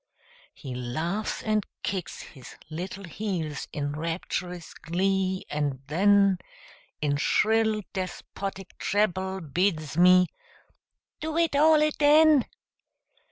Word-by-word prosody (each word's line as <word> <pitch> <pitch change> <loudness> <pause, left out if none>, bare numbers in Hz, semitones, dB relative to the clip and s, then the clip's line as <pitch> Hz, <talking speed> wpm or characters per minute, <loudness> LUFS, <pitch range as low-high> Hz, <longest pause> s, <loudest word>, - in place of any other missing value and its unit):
He 135 -3 -8
laughs 155 - -3
and 215 -1 +1 0.2
kicks 185 -3 -4
his 130 -3 -13 0.2
little 185 +5 -5
heels 170 -5 -4
in 145 -1 -3
rapturous 170 +2 -4
glee, 190 +2 -1
and 145 -3 -2
then 195 +4 +4 0.6
In 145 -1 +1
shrill, 220 +5 +2
despotic 195 0 -6
treble 190 -2 0
bids 155 -1 -1
me 180 +1 +7 0.9
"do 315 +1 -3
it 335 -3 +2
all 305 +1 +5
aden!" 305 -1 +5
185 Hz, 100 wpm, -27 LUFS, 160-210 Hz, 0.9 s, me